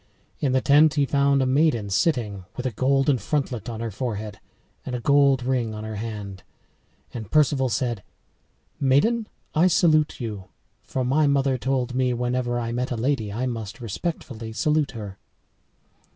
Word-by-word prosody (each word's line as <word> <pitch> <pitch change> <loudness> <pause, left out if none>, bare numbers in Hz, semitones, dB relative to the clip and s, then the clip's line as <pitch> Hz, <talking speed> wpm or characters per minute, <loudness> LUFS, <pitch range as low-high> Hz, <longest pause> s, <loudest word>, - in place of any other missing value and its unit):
In 140 - +1
the 130 - +3
tent 150 +3 +5
he 145 -2 +3
found 140 0 +2
a - - +1
maiden 130 -6 +2
sitting, 105 - 0
with 125 - -4
a 130 - 0
golden 135 +3 +2
frontlet 125 -1 -2
on 115 -1 -5
her 115 -1 -3
forehead 105 -1 -4 0.4
and 125 - -4
a - - -2
gold 140 0 +4
ring 120 -4 -1
on 105 - -6
her 110 -1 -5
hand. 105 -3 -6 0.7
And 110 -4 -6
Perceval 140 -2 +3
said, 115 -1 -1 0.8
"Maiden, 210 - +2 0.3
I 165 +4 +4
salute 155 -3 +3
you, 105 -6 -5 0.4
for 130 -1 -3
my 145 +4 +3
mother 140 -1 +2
told 130 0 -1
me 125 -1 +1
whenever 120 0 -1
I 115 -1 -3
met 125 +2 -2
a 125 - -2
lady 115 -3 -1
I 120 +5 -2
must 115 -2 -5
respectfully 115 - -5
salute 150 +3 +1
her." 100 -4 -8
125 Hz, 165 wpm, -24 LUFS, 110-140 Hz, 0.8 s, tent